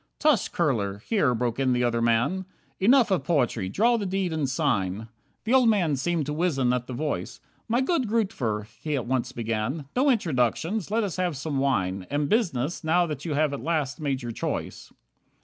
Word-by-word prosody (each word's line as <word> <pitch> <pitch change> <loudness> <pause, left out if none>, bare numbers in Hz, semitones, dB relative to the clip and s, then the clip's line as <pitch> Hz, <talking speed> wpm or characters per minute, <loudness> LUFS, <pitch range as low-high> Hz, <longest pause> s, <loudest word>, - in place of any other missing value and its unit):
"Tush, 295 -8 +2
Kurler," 105 - 0
here 150 - +2
broke 120 +1 -1
in 130 -2 +2
the 125 0 +1
other 115 -1 +1
man, 120 +12 +1 0.3
"Enough 235 +2 +5
of 190 - +1
poetry, 120 - 0
draw 235 - +3
the 210 - -3
deed 185 -2 -1
and 150 -4 -1
sign." 110 - -1 0.3
The 225 - 0
old 255 -3 +6
man 175 -9 +2
seemed 160 +3 -1
to 150 - -3
wizen 145 -7 +1
at 125 -1 -2
the 130 - -5
voice, 150 +5 -3 0.3
"My 240 +2 +2
good 265 - 0
friend, 225 -1 +2
Grootver, 110 - -3
" 120 - -32
he 150 -2 -1
at 130 - -2
once 125 0 -1
began. 115 +5 -3
"No 270 +3 +3
introductions, 170 - 0
let 225 +2 +1
us 195 -4 -3
have 180 -5 -1
some 145 -1 -2
wine, 95 -9 0
And 145 0 0
business, 170 - 0
now 175 +3 +3
that 150 -2 -5
you 155 -4 -2
at 145 -3 0
last 150 -2 -1
have - - -8
made 135 -3 -1
your 120 - -4
choice." - - -4
150 Hz, 200 wpm, -26 LUFS, 125-185 Hz, 0.3 s, old